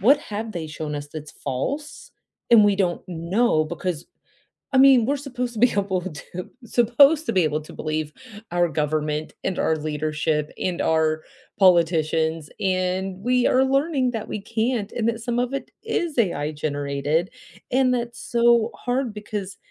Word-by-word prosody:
What 275 Hz, +9 st, +6 dB
have 215 Hz, -1 st, -5 dB
they 170 Hz, -4 st, -4 dB
shown 155 Hz, -1 st, -5 dB
us 145 Hz, 0 st, -5 dB
that's 155 Hz, -1 st, -8 dB
false, 285 Hz, -, -4 dB, 0.4 s
and 225 Hz, -3 st, +8 dB
we 205 Hz, -, +4 dB
don't 180 Hz, -3 st, 0 dB
know 170 Hz, +1 st, +1 dB
because 170 Hz, 0 st, -4 dB, 0.7 s
I 260 Hz, -, +6 dB
mean, 265 Hz, -4 st, +7 dB
we're 280 Hz, +4 st, +1 dB
supposed 250 Hz, -3 st, -4 dB
to 215 Hz, -, -6 dB
be 245 Hz, 0 st, +5 dB
able 195 Hz, -2 st, 0 dB
to, 175 Hz, +1 st, -7 dB, 0.2 s
supposed 275 Hz, +7 st, +4 dB
to -, -, +1 dB
be 185 Hz, -3 st, +4 dB
able 155 Hz, 0 st, 0 dB
to 155 Hz, -, -12 dB
believe 155 Hz, -1 st, -3 dB, 0.4 s
our 175 Hz, 0 st, +2 dB
government 150 Hz, 0 st, -1 dB
and 190 Hz, -, -2 dB
our 160 Hz, -, +2 dB
leadership 150 Hz, 0 st, -1 dB
and 180 Hz, -2 st, -1 dB
our 160 Hz, -1 st, +2 dB, 0.4 s
politicians, 160 Hz, -3 st, +3 dB
and 185 Hz, 0 st, -1 dB
we 250 Hz, 0 st, +2 dB
are 260 Hz, +1 st, +4 dB
learning 275 Hz, -1 st, +1 dB
that 220 Hz, -2 st, -4 dB
we 215 Hz, -, -4 dB
can't, 225 Hz, 0 st, -1 dB
and 230 Hz, -1 st, -1 dB
that 230 Hz, 0 st, -3 dB
some 240 Hz, 0 st, -2 dB
of 250 Hz, +2 st, -1 dB
it 275 Hz, -, -4 dB
is 345 Hz, -9 st, -2 dB
AI 155 Hz, -9 st, +1 dB
generated, 145 Hz, +3 st, -1 dB, 0.4 s
and 255 Hz, 0 st, +3 dB
that's 240 Hz, -1 st, -3 dB
so 235 Hz, -1 st, +3 dB
hard 245 Hz, -2 st, -2 dB
because 205 Hz, -2 st, -6 dB
190 Hz, 165 wpm, -23 LUFS, 155-240 Hz, 0.7 s, and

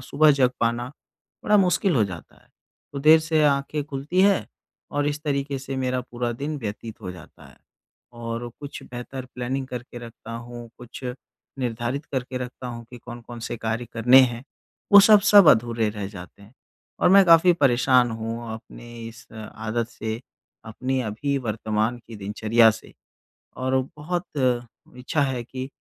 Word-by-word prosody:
सुबह 150 Hz, +4 st, +4 dB
जग 130 Hz, -3 st, +3 dB
पाना 120 Hz, +2 st, 0 dB, 0.5 s
बड़ा 210 Hz, -, +4 dB
मुश्किल 185 Hz, -1 st, +2 dB
हो 110 Hz, -, +4 dB
जाता 90 Hz, -4 st, -9 dB
है। -, -, -29 dB, 0.4 s
तो 140 Hz, -, -4 dB
देर 155 Hz, +3 st, +7 dB
से 155 Hz, -1 st, +1 dB
आँखें 145 Hz, +1 st, +1 dB
खुलती 145 Hz, +5 st, -2 dB
है 200 Hz, -1 st, +3 dB, 0.4 s
और 145 Hz, 0 st, -1 dB
इस 150 Hz, +1 st, -4 dB
तरीके 140 Hz, -2 st, -2 dB
से 135 Hz, 0 st, -6 dB
मेरा 130 Hz, -1 st, -1 dB
पूरा 120 Hz, -1 st, -4 dB
दिन 145 Hz, +5 st, -4 dB
व्यतीत 110 Hz, 0 st, -7 dB
हो 90 Hz, -, -5 dB
जाता 90 Hz, -, -14 dB
है -, -, -19 dB, 0.6 s
और 120 Hz, 0 st, -5 dB
कुछ 145 Hz, 0 st, -8 dB
बेहतर 125 Hz, +1 st, -7 dB
प्लानिंग 130 Hz, +2 st, -3 dB
करके 125 Hz, -1 st, -7 dB
रखता 115 Hz, -1 st, -10 dB
हूँ, 120 Hz, 0 st, -8 dB
कुछ 125 Hz, +1 st, -10 dB, 0.5 s
निर्धारित 120 Hz, +3 st, -3 dB
करके 130 Hz, -1 st, -4 dB
रखता 125 Hz, 0 st, -7 dB
हूँ 115 Hz, -1 st, -7 dB
कि 125 Hz, -, -10 dB
कौन-कौन 120 Hz, 0 st, -10 dB
से 120 Hz, -, -4 dB
कार्य 115 Hz, +2 st, -3 dB
करने 125 Hz, +3 st, +6 dB
हैं। 120 Hz, -1 st, 0 dB, 0.5 s
वो 205 Hz, -, +11 dB
सब 210 Hz, +1 st, +7 dB
सब 200 Hz, -5 st, +9 dB
अधूरे 115 Hz, -1 st, +3 dB
रह 105 Hz, -2 st, -5 dB
जाते 95 Hz, 0 st, -12 dB
हैं 105 Hz, +4 st, -17 dB, 0.5 s
और -, -, +5 dB
मैं 195 Hz, 0 st, +8 dB
काफ़ी 170 Hz, +2 st, +7 dB
परेशान 125 Hz, -4 st, +3 dB
हूँ 115 Hz, +1 st, -5 dB
अपनी 120 Hz, +1 st, -12 dB, 0.2 s
इस 120 Hz, +1 st, -14 dB
अ 110 Hz, -1 st, -9 dB, 0.2 s
आदत 115 Hz, +1 st, -1 dB
से, 110 Hz, +1 st, -5 dB, 0.4 s
अपनी 130 Hz, +4 st, -2 dB
अभी 120 Hz, +6 st, -2 dB
वर्तमान 110 Hz, 0 st, -1 dB
की 115 Hz, -2 st, -10 dB
दिनचर्या 110 Hz, +3 st, +3 dB
से 110 Hz, -, -9 dB, 0.6 s
और 130 Hz, +1 st, +1 dB, 0.2 s
बहुत 175 Hz, +4 st, -3 dB, 0.7 s
इच्छा 135 Hz, +4 st, -1 dB
है 130 Hz, -3 st, -1 dB
कि 130 Hz, +2 st, -6 dB
125 Hz, 165 wpm, -24 LUFS, 115-140 Hz, 0.7 s, वो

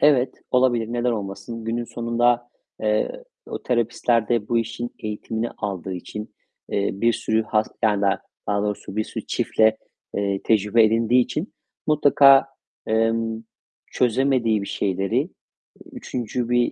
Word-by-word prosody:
Evet, 135 Hz, -4 st, +3 dB
olabilir. 120 Hz, -3 st, +2 dB
Neden 120 Hz, +1 st, +1 dB
olmasın? 105 Hz, +2 st, -5 dB
Günün 115 Hz, +1 st, -2 dB
sonunda, 120 Hz, +1 st, +1 dB, 0.3 s
eee, 110 Hz, -, 0 dB, 0.2 s
o -, -, -6 dB
terapistler 120 Hz, -2 st, +1 dB
de 115 Hz, -3 st, 0 dB
bu 120 Hz, -, +2 dB
işin 120 Hz, +1 st, -3 dB
eğitimini 110 Hz, +2 st, -3 dB
aldığı 95 Hz, -2 st, -4 dB
için, 105 Hz, +4 st, -7 dB, 0.3 s
eee, 100 Hz, 0 st, 0 dB
bir 115 Hz, +4 st, +2 dB
sürü 110 Hz, 0 st, 0 dB
has 110 Hz, 0 st, +1 dB, 0.2 s
yani, 105 Hz, -3 st, +3 dB, 0.5 s
daha 100 Hz, 0 st, 0 dB
doğrusu 105 Hz, -1 st, -4 dB
bir 110 Hz, -, +1 dB
sürü -, -, -7 dB
çiftle, 110 Hz, 0 st, +2 dB, 0.4 s
eee, 100 Hz, -1 st, -1 dB
tecrübe 110 Hz, +1 st, +4 dB
edindiği 115 Hz, +3 st, +3 dB
için 160 Hz, -, -4 dB, 0.3 s
mutlaka, 140 Hz, -2 st, +6 dB, 0.4 s
emm, 115 Hz, 0 st, +1 dB, 0.5 s
çözemediği 125 Hz, -3 st, +2 dB
bir -, -, -5 dB
şeyleri, 95 Hz, -1 st, -1 dB
eee, -, -, -1 dB, 0.6 s
3'üncü 120 Hz, 0 st, -4 dB
bir 120 Hz, 0 st, +2 dB
115 Hz, 135 wpm, -23 LUFS, 105-120 Hz, 0.6 s, mutlaka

